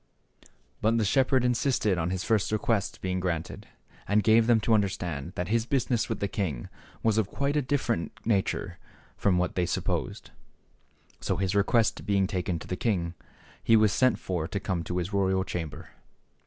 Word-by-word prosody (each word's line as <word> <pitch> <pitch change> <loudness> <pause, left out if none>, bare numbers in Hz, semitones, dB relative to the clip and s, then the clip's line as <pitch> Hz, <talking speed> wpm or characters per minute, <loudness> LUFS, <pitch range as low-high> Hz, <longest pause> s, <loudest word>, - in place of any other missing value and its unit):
But 110 +2 +2
the 110 - +1
shepherd 130 +3 +3
insisted 120 -6 +1
on 80 +1 -1
his 90 0 -2
first 110 -3 +1
request 110 -1 -1
being 95 0 -1
granted, 85 -3 -3 0.4
and 105 +1 +3
gave 110 +1 +5
them 120 -2 +5
to 115 - +2
understand 90 -6 -1
that 90 +1 -3
his 115 +1 +1
business 125 -4 0
with - - -2
the 100 - 0
king 95 - -3 0.3
was 110 -1 +3
of 105 - +1
quite 140 +1 -1
a 150 - +3
different 125 -9 -1
nature 95 -4 -1 0.4
from 95 -3 +2
what 90 0 0
they 90 -1 0
supposed. - - -3 0.9
So - - -1
his 95 0 0
request 105 +3 +2
being 100 -1 +2
taken 90 -3 -2
to - - -10
the 90 - -2
king, 90 -6 -1 0.5
he 115 - +5
was 110 -2 +5
sent 130 -1 +3
for 85 -4 -3
to 100 - -3
come 90 -4 -2
to 90 - -3
his 90 +3 -3
royal 95 -1 +2
chamber. 85 -5 -6
100 Hz, 180 wpm, -28 LUFS, 90-115 Hz, 0.9 s, gave